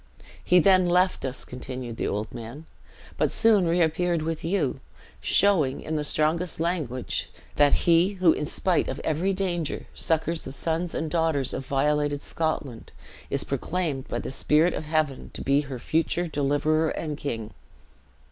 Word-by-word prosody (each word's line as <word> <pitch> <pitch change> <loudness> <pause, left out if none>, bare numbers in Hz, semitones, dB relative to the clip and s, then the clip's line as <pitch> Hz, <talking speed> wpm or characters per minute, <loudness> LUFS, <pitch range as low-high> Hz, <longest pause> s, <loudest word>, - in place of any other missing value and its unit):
"He 180 - +4
then 185 0 +5
left 180 +1 +2
us," 130 0 -4
continued 125 -2 -7
the - - -1
old 105 +1 -3
man, 120 +7 -8 0.5
"but - - +2
soon 215 -6 +4
reappeared 170 0 +1
with 160 0 -3
you; 165 -5 0 0.4
showing, 170 -10 +2
in 160 - -3
the 150 - 0
strongest 160 +4 +1
language, 155 -8 -2 0.3
that 145 -1 +5
he 170 +3 +4
who, 180 -4 +4
in 150 - -3
spite 180 +2 +1
of 130 - -4
every 165 +5 0
danger, 175 -5 -2
succors 160 +1 0
the - - -7
sons 165 +4 -2
and 160 -1 -2
daughters 160 -6 0
of 130 0 -5
violated 145 +1 +1
Scotland, 150 -7 -3 0.4
is - - 0
proclaimed 160 -7 -2
by - - -3
the - - -5
Spirit 155 +5 +3
of - - -4
Heaven 155 -3 -1
to - - -6
be 140 +1 +3
her 135 -3 -6
future 165 +6 0
deliverer 155 +1 +1
and 155 -2 -3
king." 115 -7 -5
155 Hz, 155 wpm, -26 LUFS, 140-170 Hz, 0.5 s, then